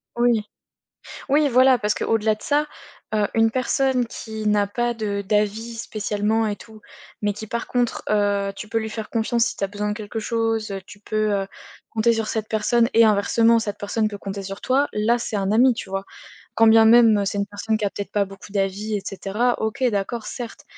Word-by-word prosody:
Oui. 240 -2 +2 0.9
Oui, 290 +2 +3
voilà 255 0 +5
parce 210 -1 0
que - - -5
au-delà 220 -1 +2
de 215 - -17
ça, 295 +1 +1 0.5
heu, 210 -1 +2
une 225 0 +4
personne 255 0 +1
qui 220 -1 -7
n'a 205 -1 +3
pas 240 +4 -1
de 210 -3 -3
d'avis 210 +3 -1
spécialement 215 0 -1
et 205 - -3
tout, 220 0 -14 0.4
mais 205 0 +1
qui 210 +2 -8
par 235 +2 -4
contre, 245 -1 -1
heu, 200 -1 +1
tu 210 - -8
peux 225 - 0
lui 220 0 -4
faire 220 0 -6
confiance 230 0 +1
si 240 - -3
tu - - -8
as 195 - +1
besoin 210 +1 -3
de - - -1
quelque 210 0 -6
chose, 225 -1 -1
tu 210 - -13
peux, 215 +1 -1
heu, 195 -1 0 0.4
compter 230 +1 +2
sur 225 -1 -1
cette 220 0 -3
personne 230 +2 +2
et 230 - +6
inversement, 225 +2 +3
cette 205 -2 -4
personne 215 +2 -1
peut 205 -1 -8
compter 195 0 -6
sur 195 +1 -7
toi, 275 +3 +1
là, 220 +3 +2
c'est 230 -2 -3
un 195 0 0
ami, 245 +3 +5
tu 225 - -7
vois? 195 0 -3 0.5
Quand 225 - +5
bien 225 0 +7
même, 225 -3 +6
c'est 200 +1 -2
une 200 - 0
personne 205 +2 -2
qui 215 - -2
a 200 - 0
peut-être 200 - -6
pas 205 -1 +2
beaucoup 195 +1 -12
d'avis 200 +2 -2
et - - -3
cetera, 210 +5 -1
OK, 220 +5 -2
d'accord, 210 +2 -3
certes, 255 +2 -7
220 Hz, 215 wpm, -22 LUFS, 205-230 Hz, 0.9 s, bien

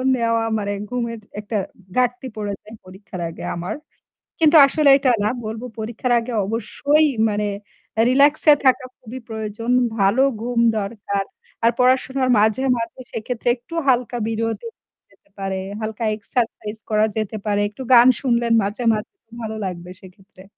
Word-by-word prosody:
নেওয়া 230 -1 +1
মানে 205 -1 -2 0.2
ঘুমের 235 -2 -3 0.2
একটা 210 +1 -3 0.4
ঘাটতি 250 +1 +1
পড়ে 205 -1 -3
যায় 215 +2 -12
পরীক্ষার 185 -1 -9
আগে 165 - -10
আমার। 175 +1 -4 0.6
কিন্তু 315 0 +5
আসলে 295 0 +3
এটা 270 -2 +2
না 210 - +2 0.2
বলব 220 +1 -5 0.2
পরীক্ষার 235 +3 -2
আগে 235 +2 -6
অবশ্যই 285 +8 +1 0.2
মানে 210 0 -1 0.6
রিল্যাক্স 285 +3 +4
এ - - +10
থাকা 255 0 +4
খুবই 250 +2 -9
প্রয়োজন। 220 +2 -4 0.3
ভালো 200 +6 +3 0.2
ঘুম 240 0 -1 0.2
দরকার। 200 -1 -3 0.4
আর 230 - +5
পড়াশোনার 260 +1 +2
মাঝে, 220 +5 +2
মাঝে 230 +2 -5
সেক্ষেত্রে 230 +2 -5
একটু 290 +7 -15
হালকা 245 -1 +2
বিরতি 225 - -2 0.4
যেতে - - -29
পারে। 195 -1 -2 0.2
হালকা 220 +1 -4
এক্সারসাইজ 220 0 -3
করা 215 0 +3
যেতে 215 0 -2
পারে। 205 -1 +1
একটু 210 - -12
গান 240 +1 +8
শুনলেন 235 -3 +1
মাঝে, 205 +5 -3
মাঝে 215 - -5 0.3
ভালো 220 -1 -4
লাগবে 180 -1 -6
সেক্ষেত্রে। 190 +1 -16
225 Hz, 145 wpm, -21 LUFS, 210-250 Hz, 0.6 s, এ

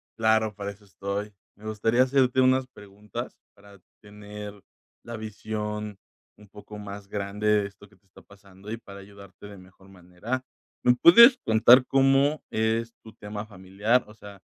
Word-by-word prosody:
claro, 110 -1 +1
para 100 0 -5
eso 105 +1 -18
estoy. 100 +1 -5 0.2
Me 105 +2 -17
gustaría 115 +3 +1
hacerte 130 -1 +1
unas 130 0 +2
preguntas 105 +2 -9 0.2
para 100 -1 -18 0.2
tener 105 0 -10 0.5
la 120 -1 -7
visión 105 -1 -6 0.4
un 105 - -18
poco 105 0 -12
más 100 -1 -9
grande 100 +1 -4
de 105 -1 +2
esto 100 0 -18
que 105 - -24
te 95 - -35
está 95 - -19
pasando, 100 0 -16
y 115 - -4
para 100 -3 -13
ayudarte 100 -1 -14
de 100 -1 -12
mejor 95 +1 -19
manera. 95 +8 -6 0.4
¿Me 125 - +5
puedes 235 - +8
contar 115 +3 +6
cómo 135 +2 +2
es 110 +1 -1
tu 110 - -13
tema 105 +1 -8
familiar? 100 +4 -1
O 105 - -14
sea, 100 -2 -13
105 Hz, 160 wpm, -25 LUFS, 100-115 Hz, 0.5 s, puedes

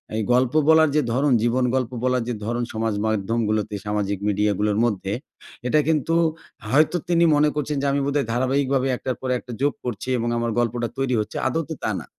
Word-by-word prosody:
এই 110 - 0
গল্প 125 +1 +2 0.2
বলার 160 -1 +6
যে 150 - +4
ধরন, 140 +3 +2
জীবন 125 +2 +2
গল্প 130 -2 -1
বলার 125 -1 +1
যে - - -1
ধরন 120 +2 -1
সমাজ 110 0 -1
মাধ্যমগুলোতে, 110 0 -1
সামাজিক 105 -1 -1
মিডিয়াগুলোর 105 0 +1
মধ্যে, 100 -4 -2 0.6
এটা 155 +5 +3
কিন্তু 160 +1 +1 0.5
হয়তো 155 +7 +3
তিনি 170 -1 +4
মনে 150 +1 +4
করছেন 150 0 -2
যে - - -1
আমি 140 - +1
বোধহয় 140 -3 0
ধারাবাহিকভাবে 130 +2 +1
১ - - -11
টার 130 -1 -1
পর 130 - -3
একটা 125 - -11
যোগ 145 +1 +2
করছি 125 +1 -4
এবং 120 0 -1
আমার 115 0 -1
গল্পটা 120 0 0
তৈরি 135 -2 0
হচ্ছে। 105 - -4
আদৌতে 160 0 -2
তা - - 0
না। - - -10
125 Hz, 190 wpm, -23 LUFS, 110-140 Hz, 0.6 s, বলার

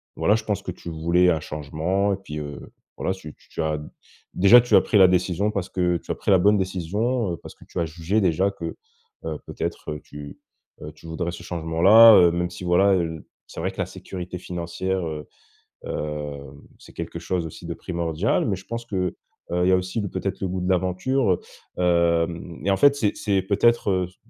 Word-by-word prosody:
voilà, 105 - +2
je 115 - -3
pense 105 -2 -2
que 90 - -4
tu 85 - -9
voulais 85 +3 +2
un 80 -2 +2
changement. 80 +7 -1
Et - - -2
puis, 75 -6 -7
heu, 75 -1 -8 0.3
voilà, 95 - -1
c'est 95 - -12
tu 75 -1 -10
tu - - -27
tu - - -3
as 80 -1 -1 0.5
déjà, 100 +6 +7
tu 120 - +2
as - - +8
pris 105 - +1
la 95 -1 +8
décision 90 +3 +1
parce 100 -3 -3
que 90 -2 +1
tu - - -18
as - - -1
pris - - -1
la 95 - +6
bonne 105 +3 +4
décision, 95 +4 -1
heu, - - -5
parce - - -12
que - - -17
tu 90 - -4
as 85 - +1
jugé 85 +6 -1
déjà 95 +2 +2
que, - - -6 0.5
heu, 80 -2 -3
peut-être 75 - -5
tu, 75 -1 -10 0.4
heu 75 - -7
tu 80 - -18
voudrais 85 +1 -3
ce 85 - -9
changement 80 -2 -4
là 110 +2 +10
heu, 85 -1 +6
même 85 0 -1
si 90 0 -9
voilà, 95 +3 +4
heu, 90 - +2
l 80 -1 -6 0.2
c'est - - -9
vrai - - -1
que - - -19
la - - +1
sécurité 90 -1 -7
financière, 90 +1 -3
heu 75 -1 -6 0.6
heu, 75 -1 -4 0.4
c'est - - -15
quelque - - -6
chose 90 -3 -2
aussi 80 - -9
de - - -4
primordial. 85 +2 -1
Mais 95 -3 -1
je 95 - -13
pense 115 0 -5
que, 95 -4 -2 0.4
heu, 90 0 +1
il - - +3
y - - +5
a - - +6
aussi 90 +4 -3
le 100 - -3
peut-être 95 -1 -4
le 95 - 0
goût 95 0 -3
de 90 - -2
l'aventure, 95 +6 +1
heu. - - -3 0.4
Hem, 85 -1 +1
et 100 - +3
en 95 - +2
fait, 145 0 +5
c'est 105 -6 +1
c'est 100 -3 0
peut-être, 105 +3 +2
heu, 90 -1 +1
s 90 - -24
90 Hz, 230 wpm, -24 LUFS, 85-100 Hz, 0.6 s, là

